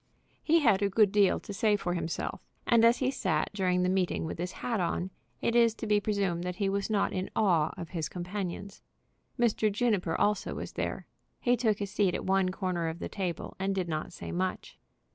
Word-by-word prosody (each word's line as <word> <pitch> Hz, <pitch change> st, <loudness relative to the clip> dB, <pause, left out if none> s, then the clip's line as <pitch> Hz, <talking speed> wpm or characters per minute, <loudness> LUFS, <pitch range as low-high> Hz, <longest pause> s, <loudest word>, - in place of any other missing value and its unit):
He 330 Hz, +1 st, +3 dB
had 215 Hz, -8 st, +4 dB
a 200 Hz, -, +2 dB
good 205 Hz, 0 st, +4 dB
deal 200 Hz, -2 st, +4 dB
to 205 Hz, -, -7 dB
say 210 Hz, +2 st, +3 dB
for 175 Hz, -3 st, -2 dB
himself; 170 Hz, -1 st, -3 dB, 0.2 s
and 230 Hz, -1 st, +4 dB
as 230 Hz, +1 st, +6 dB
he 260 Hz, 0 st, +1 dB
sat 155 Hz, -, 0 dB
during 180 Hz, -2 st, +1 dB
the -, -, +2 dB
meeting 185 Hz, -3 st, 0 dB
with 160 Hz, -, -5 dB
his 180 Hz, +1 st, -2 dB
hat 235 Hz, -4 st, -2 dB
on, 180 Hz, +1 st, -1 dB, 0.3 s
it 235 Hz, -, 0 dB
is 230 Hz, -2 st, +5 dB
to 225 Hz, -, -6 dB
be 210 Hz, -1 st, +3 dB
presumed 195 Hz, -5 st, 0 dB
that 180 Hz, 0 st, -3 dB
he 195 Hz, +1 st, 0 dB
was 200 Hz, +1 st, -1 dB
not 210 Hz, -2 st, +1 dB
in 185 Hz, 0 st, -2 dB
awe 170 Hz, -8 st, +3 dB
of 170 Hz, -, -6 dB
his 160 Hz, -3 st, -3 dB
companions. 190 Hz, +2 st, -5 dB, 0.6 s
Mr. 220 Hz, -2 st, +2 dB
Juniper 200 Hz, -6 st, 0 dB
also 210 Hz, -1 st, +1 dB
was -, -, -5 dB
there. -, -, -3 dB, 0.3 s
He 245 Hz, 0 st, +3 dB
took 220 Hz, -3 st, +1 dB
a -, -, +1 dB
seat 195 Hz, -2 st, +1 dB
at -, -, -4 dB
one 190 Hz, -1 st, +2 dB
corner 185 Hz, -3 st, -2 dB
of 160 Hz, +1 st, -3 dB
the -, -, -5 dB
table, 185 Hz, -5 st, -4 dB
and 195 Hz, 0 st, 0 dB
did 185 Hz, -2 st, -1 dB
not 155 Hz, -2 st, -3 dB
say -, -, -7 dB
much. 185 Hz, +1 st, -3 dB
195 Hz, 215 wpm, -30 LUFS, 180-210 Hz, 0.6 s, as